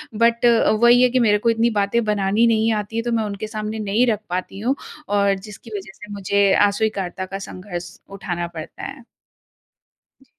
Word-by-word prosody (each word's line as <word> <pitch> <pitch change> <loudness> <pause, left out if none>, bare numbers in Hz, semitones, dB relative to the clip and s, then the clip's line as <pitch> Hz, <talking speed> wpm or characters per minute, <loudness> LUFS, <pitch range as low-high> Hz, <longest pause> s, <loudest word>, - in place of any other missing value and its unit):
But 235 +1 +2
अ, 235 -3 +4
वही 240 +3 +5
है 250 - +5
कि 255 +1 +1
मेरे 210 -3 +4
को 230 +3 +1
इतनी 230 +1 +2
बातें 225 +4 +1
बनानी 210 +2 +2
नहीं 225 0 +2
आती 210 +2 -11
है - - +1
तो 240 - -2
मैं 225 -1 +1
उनके 205 0 -4
सामने 215 0 -4
नहीं 215 +4 +2
रख 215 -3 +1
पाती 185 +2 -4
हूँ, 255 +6 0 0.3
और 200 -1 +2
जिसकी 210 +3 -11
वजह 195 0 -9
से 210 -2 -12
मुझे 200 0 +2 0.2
अस्वीकार्यता 200 -3 -2
का 195 +1 -6
संघर्ष 180 -2 -7
उठाना 175 -3 -4
पड़ता 160 -2 -9
है। 275 -3 -7 1.2
जी। - - -21
210 Hz, 190 wpm, -21 LUFS, 195-230 Hz, 1.2 s, वही